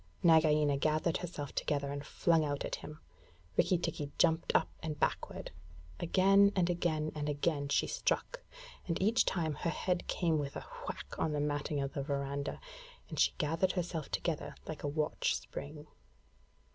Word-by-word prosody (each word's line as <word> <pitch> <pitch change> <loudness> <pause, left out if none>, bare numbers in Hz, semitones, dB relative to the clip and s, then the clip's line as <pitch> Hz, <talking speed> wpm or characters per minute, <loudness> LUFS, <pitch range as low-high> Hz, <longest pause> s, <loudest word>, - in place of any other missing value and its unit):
Nagaina 155 -3 +5
gathered 155 +3 +1
herself 155 -5 -5
together, 140 -1 -1
and 140 0 -4
flung 165 +1 +2
out 145 -1 -2
at - - -3
him. 150 0 -9 0.6
Rikki 180 - +3
tikki 150 -4 -3
jumped 165 -1 +3
up - - +4
and 155 -2 -4
backward. - - -1 0.5
Again 195 +3 +5
and 180 -2 +3
again 160 -3 0
and 150 -1 -2
again 145 -1 0
she - - +3
struck, - - -1 0.5
and 165 - 0
each 220 +6 +3
time 160 -4 0
her 170 - -2
head 180 +2 -1
came 165 -4 +1
with 140 -1 -4
a - - -6 0.2
whack - - -4
on 155 - +1
the 150 - 0
matting 145 0 -1
of 135 0 -3
the 145 - -2
verandah, 140 0 -2 0.5
and - - -5
she - - +4
gathered 165 +4 +1
herself 175 -4 -3
together 165 -4 -2
like 155 - -6
a - - -2
watch 150 +1 0
spring. 145 +4 -7
155 Hz, 165 wpm, -33 LUFS, 145-170 Hz, 0.6 s, Nagaina